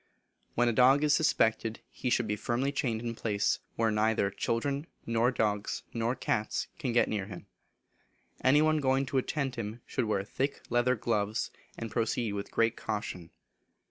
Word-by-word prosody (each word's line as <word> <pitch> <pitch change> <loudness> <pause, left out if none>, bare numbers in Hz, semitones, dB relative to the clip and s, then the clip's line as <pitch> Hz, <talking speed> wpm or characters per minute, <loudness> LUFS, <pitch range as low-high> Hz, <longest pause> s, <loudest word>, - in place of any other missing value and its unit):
When 120 +1 +3
a 120 - +2
dog 130 +5 +5
is 150 - +4
suspected, 115 -8 +2
he 125 - -3
should 120 -2 +2
he 105 - 0
firmly 120 +6 -1
chained 120 -5 -1
in 120 - -2
a - - -5
place 105 -3 0 0.2
where 115 -1 +2
neither 105 -2 +2
children 140 +9 -1 0.2
nor 115 +1 +2
dogs 105 -4 -1
nor 115 +2 0
cats 110 -4 -1
can 130 - -1
get 120 - +4
near 100 -3 -2
him. 95 -4 -9 1.0
Any 145 +4 +5
one 155 0 +3
going 135 -1 +2
to 135 0 +1
attend 135 -1 -2
him 115 +1 -5
should 125 - -1
wear 105 -3 0
thick 135 +7 -2
leather 120 +1 +3
gloves, 105 -1 -1 0.3
and 115 -2 -5
proceed 115 -2 0
with 100 0 -4
great 115 0 +2
caution. 90 -5 -4
115 Hz, 175 wpm, -30 LUFS, 110-130 Hz, 1.0 s, dog